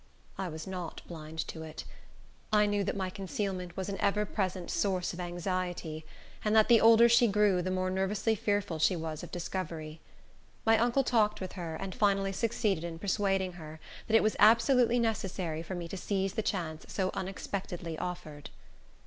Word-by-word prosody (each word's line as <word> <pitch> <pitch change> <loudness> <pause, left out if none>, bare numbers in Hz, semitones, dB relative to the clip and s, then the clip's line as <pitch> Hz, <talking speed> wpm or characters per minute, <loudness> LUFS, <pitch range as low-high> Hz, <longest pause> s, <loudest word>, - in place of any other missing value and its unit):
I 190 - -3
was 160 -2 -6
not 180 -3 -6
blind 160 -2 -9
to 160 - -6
it. 160 -1 -7 0.7
I 210 -1 +5
knew 205 -1 +1
that - - -1
my 190 -1 -2
concealment 190 -3 -4
was 190 - -3
an 200 -1 -4
ever 205 +1 +2
present 185 -3 -2
source 185 -3 0
of 175 - -8
anxiety, 175 -3 -3 0.4
and 210 0 +2
that 220 +1 +5
the 230 -2 +7
older 230 +1 +8
she 235 0 +5
grew 205 -3 +3
the 185 - -2
more 185 0 0
nervously 195 +4 +1
fearful 205 -5 -1
she 180 +4 +3
was 160 -2 -4
of - - -8
discovery. 165 -3 -5 0.6
My 225 0 +6
uncle 240 +4 +3
talked 215 -4 +2
with 185 -1 -5
her, 170 -4 -5
and 195 +1 -5
finally 195 -2 +2
succeeded 210 -5 0
in 170 -1 -5
persuading 195 -1 0
her 155 0 -9 0.3
that 225 - +2
it 225 - +6
was 215 - +2
absolutely 230 +3 +5
necessary 190 -8 -1
for 175 +3 -5
me 175 -1 -5
to 195 - -5
seize 195 0 -1
the - - 0
chance 165 -7 -3
so 190 -1 0
unexpectedly 185 -3 -4
offered. 155 -5 -6
190 Hz, 180 wpm, -31 LUFS, 175-210 Hz, 0.7 s, older